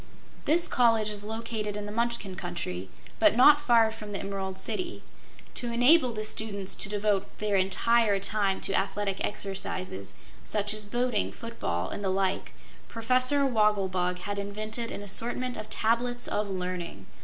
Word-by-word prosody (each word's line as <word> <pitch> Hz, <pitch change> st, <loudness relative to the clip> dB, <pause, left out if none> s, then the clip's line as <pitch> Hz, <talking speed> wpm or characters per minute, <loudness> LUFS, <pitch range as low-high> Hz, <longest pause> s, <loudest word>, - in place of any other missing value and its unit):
This 335 Hz, +3 st, +3 dB
College 225 Hz, -3 st, +3 dB
is 205 Hz, -1 st, -2 dB
located 220 Hz, -1 st, -3 dB
in 210 Hz, -, -5 dB
the 205 Hz, -, -6 dB
Munchkin 235 Hz, -4 st, -2 dB
Country, 170 Hz, -, -5 dB, 0.3 s
but 320 Hz, -6 st, +5 dB
not 290 Hz, +4 st, +7 dB
far 230 Hz, -5 st, +4 dB
from 215 Hz, -2 st, -8 dB
the 195 Hz, -, -2 dB
Emerald 195 Hz, -1 st, -4 dB
City. 350 Hz, -, -4 dB, 0.5 s
To 240 Hz, -1 st, -2 dB
enable 250 Hz, +3 st, +5 dB
the 215 Hz, -1 st, -3 dB
students 200 Hz, -3 st, 0 dB
to -, -, +1 dB
devote 205 Hz, -1 st, -1 dB
their 210 Hz, -1 st, 0 dB
entire 200 Hz, +2 st, +3 dB
time 200 Hz, -1 st, 0 dB
to 195 Hz, -, -3 dB
athletic 195 Hz, 0 st, -1 dB
exercises, 185 Hz, -, -4 dB, 0.3 s
such 210 Hz, 0 st, -1 dB
as 215 Hz, -1 st, -6 dB
boating, 240 Hz, 0 st, 0 dB
foot 230 Hz, 0 st, -9 dB
ball, 85 Hz, +1 st, -1 dB
and 205 Hz, -, -5 dB
the 195 Hz, -, 0 dB
like, 190 Hz, 0 st, -1 dB, 0.3 s
Professor 255 Hz, +5 st, +2 dB
Wogglebug 195 Hz, -7 st, +1 dB
had 200 Hz, +2 st, -4 dB
invented 215 Hz, +3 st, -4 dB
an 205 Hz, -, -6 dB
assortment 240 Hz, +5 st, 0 dB
of 215 Hz, 0 st, -7 dB
Tablets 240 Hz, +2 st, 0 dB
of 210 Hz, -1 st, -1 dB
Learning. 180 Hz, -, -4 dB
210 Hz, 155 wpm, -28 LUFS, 195-235 Hz, 0.5 s, not